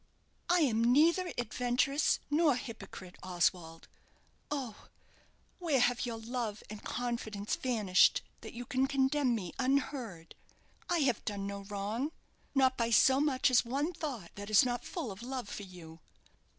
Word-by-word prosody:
"I 350 0 +4
am 230 -6 +2
neither 330 +9 +4
adventuress, 245 +4 +1
nor 300 -2 +4
hypocrite, 225 -7 -8
Oswald. 175 -2 -1 0.6
Oh, 260 -7 -5 0.7
where 320 -7 +1
have 245 0 +2
your 230 -1 -4
love 225 -2 -4
and 215 - -8
confidence 225 -4 -3
vanished 210 -7 +3 0.2
that - - -10
you 245 +1 -6
can 265 +1 +1
condemn 270 -1 +2
me 185 -6 -5
unheard? 255 - -1 0.6
I 345 -2 +2
have 255 -6 +1
done 200 -2 -3
no 200 0 -5
wrong 210 +8 -3 0.4
not 260 -1 +4
by 230 -1 +1
so 265 +4 +5
much 270 -3 +2
as 245 - +5
one 280 +8 -1
thought 265 - -5
that 205 +1 -8
is 215 +3 +6
not 245 -1 -2
full 310 - -4
of 195 +2 -9
love 255 -2 -5
for 205 - -6
you! 165 -3 -12
245 Hz, 150 wpm, -32 LUFS, 205-270 Hz, 0.7 s, is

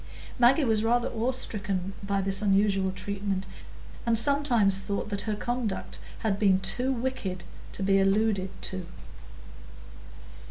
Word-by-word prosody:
Maggie 255 +5 +5
was 220 -4 +2
rather 240 +2 +2
awe 235 +3 -1
stricken 195 -6 -2
by 200 -1 -1
this 195 +1 +1
unusual 195 -1 +2
treatment, 195 0 -3 0.6
and 230 -1 +2
sometimes 235 -7 +3
thought 200 +1 -3
that 200 +1 -1
her 210 - 0
conduct 235 -2 -3 0.2
had 200 -3 0
been 195 -3 +4
too 250 +6 0
wicked 230 -8 -3 0.3
to - - -4
be 195 0 +3
alluded 195 0 +2
to. 185 -2 -4
205 Hz, 130 wpm, -27 LUFS, 195-235 Hz, 0.6 s, Maggie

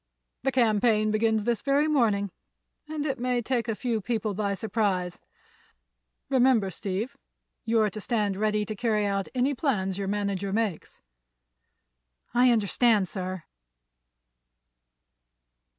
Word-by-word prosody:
"The 270 - 0
campaign 215 -3 +3
begins 220 0 +2
this 235 -1 0
very 285 +2 +2
morning, 215 -9 +2 0.6
and 305 -1 -3
it 270 -5 -2
may 250 0 0
take 240 -1 -1
a 225 - -1
few 230 -2 -1
people 220 -1 -2
by 200 0 -1
surprise. 190 -3 -1 1.1
Remember, 250 -7 +3
Steve, 195 +7 -3 0.5
you're 220 -2 +2
to 215 - -7
stand 210 -3 0
ready 210 +1 0
to 215 - -5
carry 215 -1 +1
out 195 -1 -1
any 260 +3 +2
plans 200 - -1
your 195 - -2
manager 200 -1 -2
makes." 210 -5 -2 1.3
"I 250 +1 +5
understand, 220 -2 +3
sir." 185 -3 -4
215 Hz, 120 wpm, -27 LUFS, 200-240 Hz, 1.3 s, I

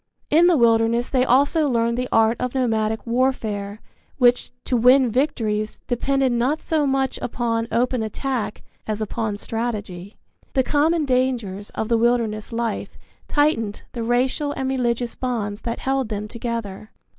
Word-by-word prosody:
In 335 +3 +6
the 350 -3 +4
wilderness 230 0 +3
they 255 -2 +3
also 285 +4 +3
learned 235 -1 +1
the 250 +1 -2
art 225 +1 +4
of 250 +1 -2
nomadic 220 -3 0
warfare 220 -5 -1 0.4
which, 245 -2 +3
to 255 - -1
win 250 +1 +5
victories, 220 -5 -1
depended 270 +2 +1
not 250 +6 +1
so 310 -3 0
much 270 -1 0
upon 230 -1 -1
open 250 0 +1
attack 220 +1 -3 0.2
as 215 -1 -2
upon 215 -1 -2
strategy. 210 -4 -5 0.4
The 265 - +3
common 310 +3 +2
dangers 245 -7 -1
of 220 - -2
the 230 -1 +2
wilderness 230 -2 0
life 230 -1 -3 0.3
tightened 230 -9 0
the 235 - -5
racial 255 +5 0
and 265 - -3
religious 245 -2 -1
bonds 220 -5 -3
that 230 0 -3
held 265 -3 -1
them 210 -1 -4
together. 225 -3 -5
235 Hz, 145 wpm, -22 LUFS, 220-260 Hz, 0.4 s, In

